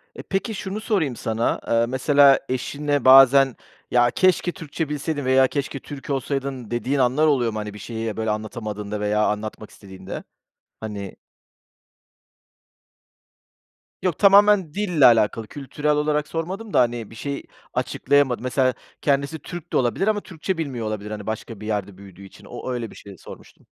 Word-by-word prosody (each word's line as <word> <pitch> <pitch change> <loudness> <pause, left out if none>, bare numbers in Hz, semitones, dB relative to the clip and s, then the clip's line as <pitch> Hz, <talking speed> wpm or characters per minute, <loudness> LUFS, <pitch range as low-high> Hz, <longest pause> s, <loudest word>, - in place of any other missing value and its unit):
E, - - -7
peki 195 +4 -2
şunu 195 +2 -5
sorayım 185 - 0
sana, 115 0 -1
ııı, 115 0 +2
mesela 140 +2 +5
eşine 145 +2 -2
bazen 135 0 +7 0.4
ya, 120 0 +4
“Keşke 185 -1 +2
Türkçe 160 -1 -5
bilseydin.” 150 -1 -3
veya 130 0 +5
“Keşke 140 0 -3
Türk 145 +1 -10
olsaydın.” 135 -3 -3
dediğin 130 +4 -1
anlar 130 +5 +3
oluyor 125 -6 +2
mu? 110 - -3
Hani, 105 -1 -6
bir 105 - -10
şeyi, 110 0 -5
böyle, 110 0 -1
anlatamadığında 105 -1 -4
veya 105 +1 +1
anlatmak 105 +1 -4
istediğinde, 95 -2 -9 0.6
hani 100 -3 -6 2.9
Yok, 180 -4 -1
tamamen 200 -4 +5
dille 180 -9 +2
alakalı, 115 -2 +4
kültürel 145 +1 -3
olarak 150 0 +1
sormadım 190 +6 -5
da, - - +4
hani, 120 -3 0
bir - - -13
şeyi 140 +4 -5 0.3
açıklayamadın, 140 -3 +1
mesela, 130 0 +1 0.3
kendisi 140 +2 0
Türk 175 +2 -9
de - - +3
olabilir 130 - 0
ama 215 -1 +1
Türkçe 185 +1 -4
bilmiyor 130 -8 -3
olabilir. 105 0 -5
Hani, 105 -1 -6
başka 110 -1 -5
bir 105 - -8
yerde 100 -3 -3
büyüdüğü 100 -1 -13
için 95 - -16
o - - -6
öyle 120 -3 -4
bir - - -14
şey 100 -2 -12
sormuştum. - - -14
130 Hz, 155 wpm, -23 LUFS, 110-150 Hz, 2.9 s, bazen